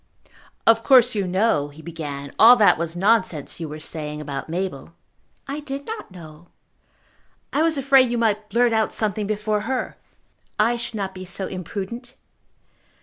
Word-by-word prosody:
"Of 225 0 +5
course 250 -2 +5
you 200 -3 -1
know," 185 -5 +1
he 150 +2 -14
began, 145 -4 -6
"all 235 +3 +9
that 210 -8 +4
was 170 0 -3
nonsense 185 -7 +1
you 165 -2 -5
were 155 +1 -7
saying 150 -1 -4
about 145 0 -6
Mabel." 170 -3 -4 0.5
"I 280 +2 -4
did 280 -1 -6
not 445 0 -6
know." 170 -2 -13 1.1
"I 295 - +2
was 320 -1 +2
afraid 270 -2 +4
you 240 - -1
might 215 -2 0
blurt 240 0 +2
out 220 -1 +1
something 210 -1 -1
before 210 0 -1
her." 260 -1 -3 0.6
"I 230 +3 +3
should 235 -1 -6
not 195 -2 -3
be 185 - -8
so 190 +1 -5
imprudent." 205 +8 -6
205 Hz, 160 wpm, -22 LUFS, 170-235 Hz, 1.1 s, all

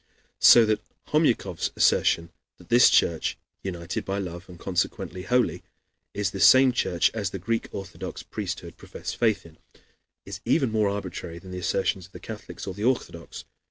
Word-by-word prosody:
So 120 -2 +8
that 110 -1 0 0.3
Homyakov's - - +1
assertion 85 0 +2 0.3
that - - -18
this 120 +1 +7
church, 80 -2 +2 0.2
united 85 -3 -4
by 95 +1 -3
love, 90 -2 -6
and 90 - -11
consequently 90 0 -2
holy, 125 +5 +1 0.5
is 100 -2 -1
the 95 - -6
same 130 +8 +7
church 90 -8 +1
as 105 -5 -2
the 95 - -5
Greek 115 +5 -2
Orthodox 95 -1 -7
priesthood - - -6
profess - - -7
faith 110 -6 +1
in, 80 -1 -16 0.7
is - - -8
even 130 -4 +2
more 110 -2 +2
arbitrary 95 -4 -5
than 90 +2 -11
the 90 - -5
assertions 95 0 -1
of 95 - -32
the - - -9
Catholics 110 -2 -8
or 95 - -4
the 100 +3 -6
Orthodox. 115 -9 -2
95 Hz, 165 wpm, -26 LUFS, 90-110 Hz, 0.7 s, So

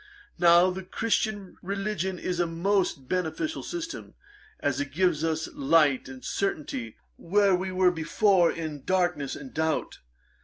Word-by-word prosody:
Now 175 +1 +6
the 190 +1 -5
Christian 205 0 -2
religion 195 -1 -2
is 175 0 -3
a 175 - +2
most 170 -4 0
beneficial 180 - -2
system, 335 -1 -6 0.4
as 140 -1 0
it 145 -2 -4
gives 170 -1 +1
us 160 0 -1
light 140 -2 +3
and 130 -1 -10
certainty 140 - -3 0.2
where 200 +2 +3
we 185 +1 -1
were 185 -1 +4
before 175 +2 +3
in 155 -4 -6
darkness 175 -6 0
and 265 -2 -10
doubt. 160 0 -1
175 Hz, 140 wpm, -27 LUFS, 155-190 Hz, 0.4 s, Now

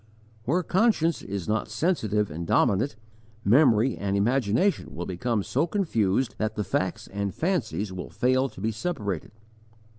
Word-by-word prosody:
Where 175 +8 +1
conscience 180 -4 +2
is 100 -3 -5
not 110 0 -1
sensitive 105 - 0
and 85 +2 -5
dominant, 110 +5 +2 0.5
memory 120 0 +5
and 100 0 -1
imagination 120 - +1
will 85 +2 -4
become 105 +3 -1
so 145 - 0
confused 130 - 0
that 110 0 -1
facts 95 -1 -1
and 100 0 -4
fancies 110 - -1
will 90 - -6
fail 130 +2 +1
to - - -13
be 110 +3 0
separated. 105 - -3
110 Hz, 140 wpm, -26 LUFS, 100-140 Hz, 0.5 s, memory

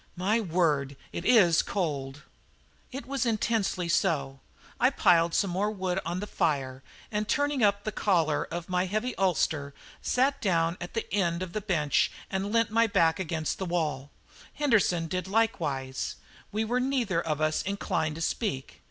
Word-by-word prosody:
My 200 +6 +1
word, 155 -7 0 0.2
it 170 - -5
is 180 -9 +5
cold!" 145 -6 -3 0.7
It 265 -1 -6
was 275 +1 -1
intensely 215 -5 0
so. 145 -6 0 0.4
I 250 - +5
piled 170 -9 +3
some 195 - +1
more 195 +4 0
wood 190 -3 -2
on 175 +2 -3
the - - -3
fire 135 -9 -1 0.3
and, 210 0 -1
turning 285 -1 +1
up 200 0 +3
the 215 - -2
collar 165 -8 +1
of 170 0 -6
my 180 0 0
heavy 215 +6 -1
ulster, 155 -6 0 0.3
sat 265 +3 +1
down 170 -3 +1
at 175 - -7
one 225 - -1
end 175 -3 0
of 180 - -7
the 215 - -2
bench 165 -8 +1 0.2
and 195 +1 -2
leant 230 -1 +2
my 230 +1 +4
back 165 -5 +2
against 160 -3 -2
the 190 - -2
wall. 155 -5 -2 0.5
Henderson 215 - +2
did 180 +3 -3
likewise; 150 -11 -1 0.4
we 215 +2 -1
were 245 +3 0
neither 250 -9 0
of 155 -3 -2
us 155 0 +1
inclined 165 -5 -2
to 165 - -6
speak. 165 - -2
180 Hz, 165 wpm, -28 LUFS, 160-215 Hz, 0.7 s, is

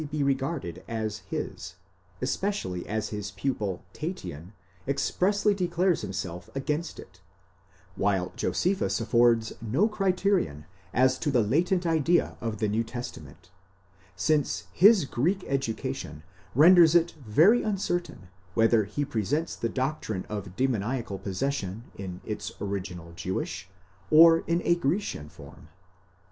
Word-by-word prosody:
419 150 -1 -2
regarded 135 - -2
as 110 -2 -3
his, - - -5 0.5
especially 190 - -2
as 110 0 -2
his 105 -1 -4
pupil 105 -8 -3
Tatian 90 - -6 0.3
expressly 200 +9 +1
declares 180 -1 +1
himself 90 -2 -5
against 150 +4 -2
it;*° - - -13 0.8
while 95 -2 0
Josephus 180 +10 0
affords 115 0 +3
no 130 - +2
criterion 190 - 0 0.3
as 130 +1 +3
to - - -1
the 125 -5 +3
latent 175 - +1
idea 165 +1 +2
of 115 -2 -3
the 110 - 0
New 110 +3 0
Testamant, 90 - -9 0.6
since 145 - +1
his 195 - +6
Greek 175 +10 0
education 115 - -3 0.3
renders 170 +2 +7
it 170 0 +4
very 160 - +5
uncertain 175 - -2 0.3
whether 115 -1 +4
he 145 +7 -2
presents 145 - -1
the 115 - -2
doctrine 130 -8 -2
of 100 -3 -6
demoniacal 120 -4 -1
possession 105 0 -3
in 90 -2 -7
its 105 -2 -4
original 90 -4 -5
Jewish, 90 +2 -4 0.4
or 165 +1 +8
in 170 +1 +1
a 175 - +5
Grecian 165 - -2
form. 75 -2 -14
125 Hz, 120 wpm, -27 LUFS, 100-170 Hz, 0.8 s, or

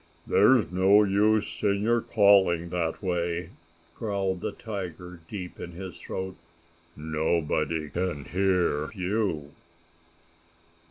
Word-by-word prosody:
"There's - - +4
no 95 +3 +5
use 105 +2 +1
in 100 -1 +1
your 115 +1 +2
calling 95 -6 +4
that 85 +1 -2
way!" 85 -1 -2 0.4
growled 100 -4 -2
the - - -2
tiger, 90 -4 -7
deep 90 -4 -7
in 85 - -7
his 95 +1 -8
throat. 95 0 -5 0.6
"Nobody 80 0 -1
can 85 -4 -3
hear 90 -5 +1
you!" 95 -6 -2
90 Hz, 105 wpm, -27 LUFS, 85-100 Hz, 0.6 s, no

